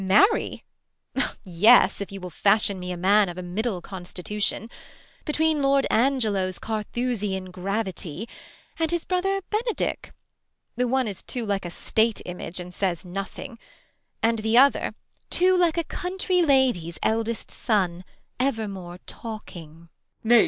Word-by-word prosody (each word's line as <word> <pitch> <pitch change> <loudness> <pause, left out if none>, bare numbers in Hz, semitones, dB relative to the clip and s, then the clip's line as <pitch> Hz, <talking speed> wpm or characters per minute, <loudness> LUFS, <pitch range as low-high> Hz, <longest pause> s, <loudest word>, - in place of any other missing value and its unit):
Beat. 190 - -4
Marry? 215 - +4 0.8
yes, 205 +5 +5
if 200 - -5
you 195 - -6
will 180 -1 -7
ftishion 200 0 +2
me 180 0 -4
a 180 - -4
man 200 +2 +4
Of 175 - -7
a 185 - -4
middle 190 +2 -2
constitution, 195 +4 -3 0.6
between 310 -1 +2
Lord 275 0 +3
Angelo's 215 -7 +2
Carthusian 210 -4 -2
gravity 190 -1 -3 0.5
And 325 -1 +1
his 345 -1 -1
brother 390 +2 0
Benedick; 450 +1 -1 0.6
the 250 +1 +1
one 260 0 +1
is 200 -3 -5
Too 245 -3 -4
like 200 -3 -1
a - - -3
State 220 +5 +1
image 180 0 -6
and 180 0 -8
says 185 -2 -1
nothing; 195 +7 -6 0.6
And 230 0 +3
the 220 +2 +2
other, 275 +2 +5 0.3
too 370 +1 +4
like 350 -2 +3
a 335 - +2
country 360 +2 -1
lady's 255 - +3
Eldest 225 +1 -1
son, 185 -6 0 0.4
evermore 200 -9 -2
talking. 170 -7 -9
215 Hz, 135 wpm, -25 LUFS, 185-265 Hz, 0.8 s, yes